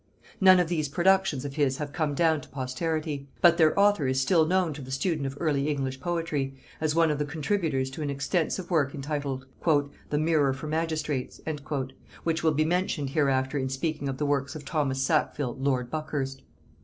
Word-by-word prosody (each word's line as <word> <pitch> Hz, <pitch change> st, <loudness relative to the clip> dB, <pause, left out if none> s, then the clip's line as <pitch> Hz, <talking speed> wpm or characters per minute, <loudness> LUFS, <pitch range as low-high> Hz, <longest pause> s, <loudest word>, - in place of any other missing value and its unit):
None 185 Hz, -1 st, +7 dB
of 175 Hz, -, +2 dB
these 155 Hz, -4 st, -1 dB
productions 180 Hz, -3 st, +2 dB
of 140 Hz, +1 st, -6 dB
his 135 Hz, -3 st, +2 dB
have 145 Hz, -1 st, -5 dB
come 150 Hz, -3 st, -1 dB
down 160 Hz, -1 st, +3 dB
to -, -, -14 dB
posterity; 145 Hz, +2 st, -3 dB
but 170 Hz, -1 st, +6 dB
their 160 Hz, +4 st, +4 dB
author 200 Hz, -8 st, +4 dB
is 130 Hz, 0 st, +1 dB
still 160 Hz, +4 st, +3 dB
known 180 Hz, -2 st, +2 dB
to 145 Hz, -, -8 dB
the 130 Hz, -, -9 dB
student 140 Hz, +1 st, -1 dB
of 135 Hz, +1 st, -6 dB
early 145 Hz, -4 st, +1 dB
English 135 Hz, -2 st, -2 dB
poetry, 155 Hz, -4 st, -2 dB, 0.3 s
as 155 Hz, -1 st, +1 dB
one 165 Hz, -1 st, +4 dB
of 150 Hz, -, -2 dB
the -, -, +2 dB
contributors 150 Hz, -4 st, -1 dB
to 145 Hz, -, -7 dB
an 145 Hz, -, -2 dB
extensive 160 Hz, +6 st, -1 dB
work 145 Hz, -5 st, +2 dB
entitled 140 Hz, -2 st, -3 dB, 0.6 s
"The 150 Hz, -, 0 dB
Mirror 155 Hz, -3 st, +2 dB
for 135 Hz, +3 st, -7 dB
Magistrates," 155 Hz, -3 st, -2 dB, 0.8 s
which 165 Hz, 0 st, 0 dB
will 160 Hz, -2 st, +3 dB
be 155 Hz, +1 st, +2 dB
mentioned 170 Hz, -5 st, 0 dB
hereafter 135 Hz, -2 st, +1 dB
in 130 Hz, 0 st, -1 dB
speaking 145 Hz, +1 st, -2 dB
of 135 Hz, -, -3 dB
the 150 Hz, -, -1 dB
works 140 Hz, 0 st, 0 dB
of 150 Hz, -, -8 dB
Thomas 135 Hz, -4 st, 0 dB
Sackville 140 Hz, -3 st, 0 dB
lord 130 Hz, -3 st, 0 dB
Buckhurst. 140 Hz, -4 st, -3 dB
150 Hz, 190 wpm, -27 LUFS, 135-160 Hz, 0.8 s, None